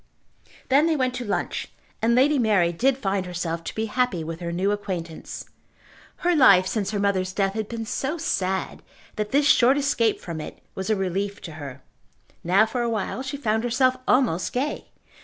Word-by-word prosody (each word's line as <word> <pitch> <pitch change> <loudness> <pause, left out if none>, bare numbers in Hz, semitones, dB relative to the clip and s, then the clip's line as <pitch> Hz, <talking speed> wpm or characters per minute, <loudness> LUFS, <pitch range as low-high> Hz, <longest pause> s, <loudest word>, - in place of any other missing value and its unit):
Then 285 +4 +5
they 325 - +2
went 255 -3 0
to 250 0 -4
lunch, 205 - -2 0.3
and 235 +1 +3
Lady 280 +3 +4
Mary 205 -7 +3
did 260 +9 +2
find 195 -6 -1
herself 170 -2 -3
to - - -5
be 220 - -1
happy 225 -6 0
with 165 +1 -6
her 170 -1 -4
new 185 +4 0
acquaintance. 180 -6 -5 0.8
Her 355 -1 +4
life 200 - +7
since 200 0 -1
her 215 - -2
mother's 190 -2 0
death 195 -1 0
had 215 -1 -3
been 230 -1 -4
so 275 +8 -2
sad, 190 - -2 0.3
that 210 0 -2
this 285 +4 +3
short 260 0 +5
escape 255 -6 +1
from 165 -3 -6
it - - -9
was 190 +1 -4
a 215 - +3
relief 195 +1 -2
to 165 - -8
her. 140 -4 -9 0.6
Now 190 +5 +4
for 240 +2 -3
awhile 230 +1 -2
she 270 +1 -4
found 220 -4 0
herself 255 +2 +2
almost 235 -10 +2
gay. 275 +4 -2
210 Hz, 185 wpm, -24 LUFS, 185-255 Hz, 0.8 s, life